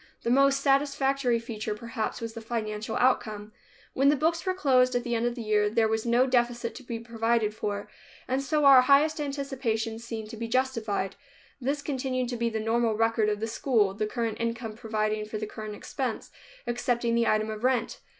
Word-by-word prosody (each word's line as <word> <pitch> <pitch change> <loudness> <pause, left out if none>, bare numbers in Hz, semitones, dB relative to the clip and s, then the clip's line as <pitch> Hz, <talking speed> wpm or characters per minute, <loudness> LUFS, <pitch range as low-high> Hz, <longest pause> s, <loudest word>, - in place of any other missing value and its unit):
The 235 - 0
most 275 +1 +4
satisfactory 275 -2 +2
feature, 220 -2 -4
perhaps, 230 +1 -4
was 230 -1 -5
the 230 - -7
financial 220 -1 -3
outcome. 215 -4 +1 0.4
When 275 +2 +4
the 295 - +4
books 325 +4 0
were 370 -1 -1
closed, 255 -7 +3
at 245 - +1
the 240 -1 -2
end 235 +1 +1
of 240 - -2
the 240 - -5
year, 210 -1 +2
there 225 +1 +2
was 220 +1 -1
no 240 +2 +4
deficit 240 -2 0
to - - -10
be 235 -2 -4
provided 225 -1 0
for, 205 -1 -4 0.4
and 260 +1 0
so 300 +2 +1
our 270 -2 +9
highest 295 +4 +4
anticipations 255 -6 -2
seemed 225 -2 -6
to 225 - -8
be 230 +1 -4
justified. 230 -6 -1 0.4
This 275 +3 -1
has 285 - -10
continued 255 -3 -2
to 245 - -3
be 235 0 0
the 220 -1 -3
normal 225 0 +1
record 225 -1 +2
of 210 -1 -1
the - - 0
school, 225 -4 +1
the 210 +1 -2
current 230 -1 -3
income 230 -1 -3
providing 215 -1 -2
for 215 0 -5
the 215 - -3
current 215 0 -7
expense, 245 +2 -4 0.3
excepting 240 -1 0
the 235 0 +2
item 215 0 +1
of 215 +1 -7
rent. 255 -2 0
235 Hz, 200 wpm, -27 LUFS, 220-260 Hz, 0.4 s, our